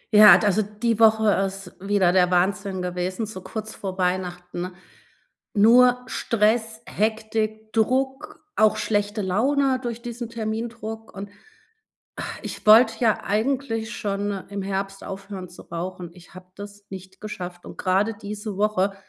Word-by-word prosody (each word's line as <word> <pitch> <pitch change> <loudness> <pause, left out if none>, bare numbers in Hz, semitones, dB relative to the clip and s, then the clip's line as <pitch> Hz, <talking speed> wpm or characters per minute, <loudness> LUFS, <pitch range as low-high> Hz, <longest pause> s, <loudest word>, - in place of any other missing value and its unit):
Ja, 210 0 +10
d 210 - -1
also 205 +1 +3
die 215 +2 -2
Woche 220 -1 +5 0.2
ist 195 -1 -9
wieder 195 -2 +2
der 180 -1 +4
Wahnsinn 185 +1 0
gewesen, 180 +4 -2
so 210 -3 -8
kurz 220 +3 -6
vor 190 -2 -6
Weihnachten, 180 -1 -2 0.8
nur 245 +4 +6
Stress, 220 -1 0
Hektik, 220 0 -2
Druck, 265 +7 0 0.2
auch 215 -1 +4
schlechte 205 0 -1
Laune 260 +8 +1
durch 235 -2 -5
diesen 240 -1 -6
Termindruck. 225 0 -5
Und, 200 +1 -7 0.9
ah, - - -3 0.2
ich - - -7
wollte 225 +2 +7
ja 225 -3 +2
eigentlich 225 +1 -1
schon 200 -1 -3
im 200 0 -5
Herbst 195 0 -4
aufhören 195 -1 -7
zu 175 - -13
rauchen. 175 +1 -6
Ich 180 +1 -17
habe 185 0 -12
das 205 0 -10
nicht 190 0 -10
geschafft 180 -4 -7
und - - -10
grade 195 +4 +1
diese 210 0 -6
Woche, 200 -1 +1
210 Hz, 140 wpm, -24 LUFS, 190-225 Hz, 0.9 s, Ja